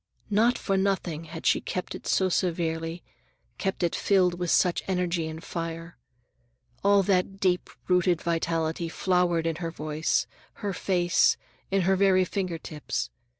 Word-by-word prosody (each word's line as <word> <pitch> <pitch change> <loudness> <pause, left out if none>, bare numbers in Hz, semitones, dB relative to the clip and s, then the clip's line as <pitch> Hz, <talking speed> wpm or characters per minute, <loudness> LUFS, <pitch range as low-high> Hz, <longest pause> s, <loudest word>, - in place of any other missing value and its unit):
Not 230 +4 +4
for 195 -1 0
nothing 190 -5 -1
had 160 0 -9
she - - +3
kept 180 - -4
it - - -8
so 190 - +3
severely, 165 -2 -1 0.6
kept 195 -2 -2
it 170 - +1
filled 180 -3 +2
with 175 -1 -1
such 180 +1 +3
energy 180 -3 0
and 160 +1 -7
fire. 165 0 -5 0.9
All 200 0 +5
that 195 0 +1
deep 180 -2 +1 0.2
rooted 180 -2 +3
vitality 165 0 -1
flowered 175 -2 +1
in 165 -1 -1
her 170 -1 -3
voice, 155 -1 -1 0.4
her 200 - 0
face, 175 -2 +2 0.3
in 195 0 +2
her 190 +2 +3
very 185 -1 +4
finger 180 -2 -2
tips. 155 -2 -4
175 Hz, 150 wpm, -27 LUFS, 165-190 Hz, 0.9 s, All